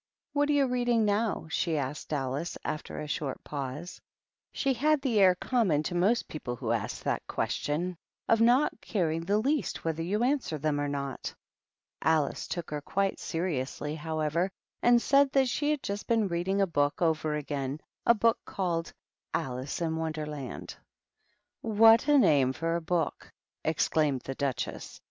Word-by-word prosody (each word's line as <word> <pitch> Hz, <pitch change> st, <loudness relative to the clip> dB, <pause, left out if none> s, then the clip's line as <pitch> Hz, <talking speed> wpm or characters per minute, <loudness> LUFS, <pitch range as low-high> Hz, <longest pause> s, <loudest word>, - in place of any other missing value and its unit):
What 290 Hz, 0 st, +2 dB
are -, -, +4 dB
you 285 Hz, -1 st, +4 dB
reading 245 Hz, -3 st, +2 dB
now 210 Hz, -1 st, 0 dB
?" -, -, -16 dB
she 165 Hz, -2 st, 0 dB
asked 140 Hz, +2 st, -4 dB
Alice, 140 Hz, +3 st, -2 dB
aflter 155 Hz, 0 st, -4 dB
a -, -, -6 dB
short 145 Hz, -2 st, -3 dB
pause. 145 Hz, +4 st, -6 dB, 0.5 s
She 275 Hz, -, 0 dB
had 300 Hz, +5 st, +2 dB
the 255 Hz, -6 st, +1 dB
air 185 Hz, -2 st, +6 dB
common 185 Hz, -, +1 dB
to 175 Hz, -, -3 dB
most 195 Hz, +7 st, +2 dB
people 125 Hz, -5 st, -5 dB
who 120 Hz, -2 st, -3 dB
ask 115 Hz, -3 st, -2 dB
that -, -, -2 dB
question, 175 Hz, +5 st, -1 dB, 0.3 s
of 225 Hz, 0 st, +4 dB
not 245 Hz, +2 st, +3 dB
caring 165 Hz, -6 st, -1 dB
the 200 Hz, +5 st, +1 dB
least 275 Hz, -, -1 dB
whether 165 Hz, 0 st, -1 dB
you 205 Hz, +7 st, 0 dB
answer 255 Hz, -, 0 dB
them 145 Hz, 0 st, 0 dB
or 145 Hz, -, 0 dB
not. 140 Hz, -2 st, -4 dB, 0.7 s
Alice 155 Hz, -2 st, +1 dB
took 175 Hz, -3 st, -5 dB
her 150 Hz, -1 st, -3 dB
quite 195 Hz, +6 st, -1 dB
seriously, 150 Hz, -4 st, -2 dB
however, 160 Hz, +3 st, -1 dB, 0.3 s
and 240 Hz, 0 st, +6 dB
said 275 Hz, +2 st, +4 dB
that 270 Hz, -1 st, +4 dB
she 290 Hz, +4 st, 0 dB
had 300 Hz, -2 st, 0 dB
just 200 Hz, +1 st, -4 dB
been 225 Hz, -3 st, +2 dB
reading 190 Hz, +3 st, 0 dB, 0.4 s
over 160 Hz, -2 st, +1 dB
again 145 Hz, -1 st, -3 dB, 0.2 s
a 235 Hz, -, +5 dB
book 230 Hz, +1 st, +3 dB
called 170 Hz, -4 st, -2 dB, 0.4 s
Alice 130 Hz, +5 st, -3 dB
in 160 Hz, -1 st, 0 dB
Wonderland. 150 Hz, -4 st, -4 dB, 0.5 s
" -, -, -45 dB
What 225 Hz, +3 st, +6 dB
a 295 Hz, -1 st, +6 dB
name 140 Hz, -, +4 dB
for 165 Hz, +3 st, -1 dB
a 170 Hz, -, -1 dB
book!" 165 Hz, -2 st, -2 dB, 0.3 s
exclaimed 155 Hz, -3 st, +1 dB
the 135 Hz, -, -5 dB
Duchess. 135 Hz, -4 st, -3 dB
165 Hz, 165 wpm, -29 LUFS, 150-225 Hz, 0.7 s, air